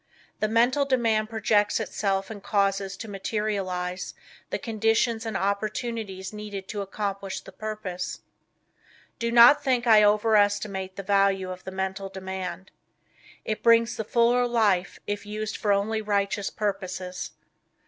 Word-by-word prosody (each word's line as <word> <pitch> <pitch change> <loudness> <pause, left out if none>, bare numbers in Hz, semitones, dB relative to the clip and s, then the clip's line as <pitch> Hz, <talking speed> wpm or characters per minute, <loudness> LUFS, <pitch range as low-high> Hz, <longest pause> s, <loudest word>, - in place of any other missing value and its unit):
The 215 - +1
mental 240 +6 +3
demand 230 -5 +1
projects 220 -2 +2
itself 195 -2 -1
and 205 -2 -8
causes 195 -1 0
to 225 - -7
materialize 195 -3 -3 0.3
the - - -1
conditions 225 +1 0
and 215 -3 -2
opportunities 200 -1 -3
needed 205 -2 -6
to 205 - -3
accomplish 200 -1 -4
the - - -12
purpose. 210 -5 -5 1.0
Do 235 0 -1
not 245 +5 +8
think 250 -2 +1
I 220 -2 +7
over 210 +1 +4
estimate 200 -2 +1
the 200 - -6
value 195 -1 +2
of 185 0 -9
the 190 - -5
Mental 190 +1 -3
Demand. 190 -1 -6 0.7
It 215 - -2
brings 230 0 +4
the 220 - -3
fuller 240 +3 +3
life 205 -7 +1
if 205 0 -4
used 215 +1 -4
for 210 - 0
only 210 +2 +1
righteous 200 -1 0
purposes. 185 -3 -4
205 Hz, 140 wpm, -26 LUFS, 195-220 Hz, 1.0 s, not